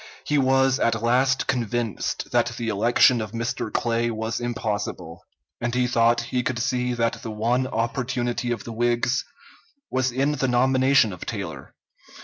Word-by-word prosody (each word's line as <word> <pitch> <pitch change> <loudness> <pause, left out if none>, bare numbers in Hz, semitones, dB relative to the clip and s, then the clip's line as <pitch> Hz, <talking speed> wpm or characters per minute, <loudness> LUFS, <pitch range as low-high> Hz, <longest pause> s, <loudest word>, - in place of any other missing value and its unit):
He 150 -1 +2
was 135 0 +3
at 115 -1 +1
last 130 +3 +2
convinced 120 -4 -2
that - - +3
the 115 -1 -2
election 115 +3 +4
of 110 +1 -6
Mr. 115 +2 -3
Clay 115 0 0
was 110 0 -3
impossible, 105 -8 -4 0.4
and 120 0 -2
he 125 0 +2
thought 120 -1 +3
he 125 +1 -2
could 125 0 -2
see 125 0 -1
that 115 -1 -1
the 115 - -6
one 120 +4 0
opportunity 120 +1 -2
of 120 - -3
the 115 - -7
Whigs 120 +2 +1 0.7
was 130 0 +1
in 135 +4 +1
the 140 -3 -1
nomination 130 -1 +3
of 90 - -8
Taylor. - - -6
120 Hz, 155 wpm, -24 LUFS, 115-130 Hz, 0.7 s, election